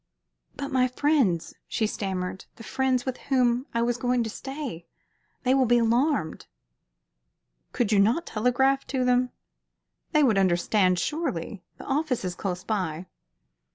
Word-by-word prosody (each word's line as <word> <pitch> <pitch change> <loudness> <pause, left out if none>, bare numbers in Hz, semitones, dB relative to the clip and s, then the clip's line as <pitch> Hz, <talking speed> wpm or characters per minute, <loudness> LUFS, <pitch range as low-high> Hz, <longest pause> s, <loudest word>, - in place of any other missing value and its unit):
"But 280 0 -4
my 255 -1 +3
friends," 255 - +1
she 220 - 0
stammered 190 -3 -3
"the 230 - -12
friends 260 +1 0
with 260 -1 -3
whom 250 -1 +2
I 235 0 0
was 240 0 0
going 245 0 +1
to 225 - -4
stay 270 - -6 0.6
they 255 - +3
will 265 -2 +3
be 240 +1 +4
alarmed." 235 - +1 1.2
"Could 225 -3 0
you 205 - +4
not 235 +12 +3
telegraph 255 +4 +1
to 260 -2 -1
them? 250 0 +3 0.8
They 305 -2 +4
would 220 -7 +4
understand, 185 +1 +2
surely. 210 - -3 0.2
The - - -10
office 275 -6 -1
is 180 - -2
close 180 0 -4
by." 185 -6 -2
240 Hz, 145 wpm, -26 LUFS, 195-265 Hz, 1.2 s, be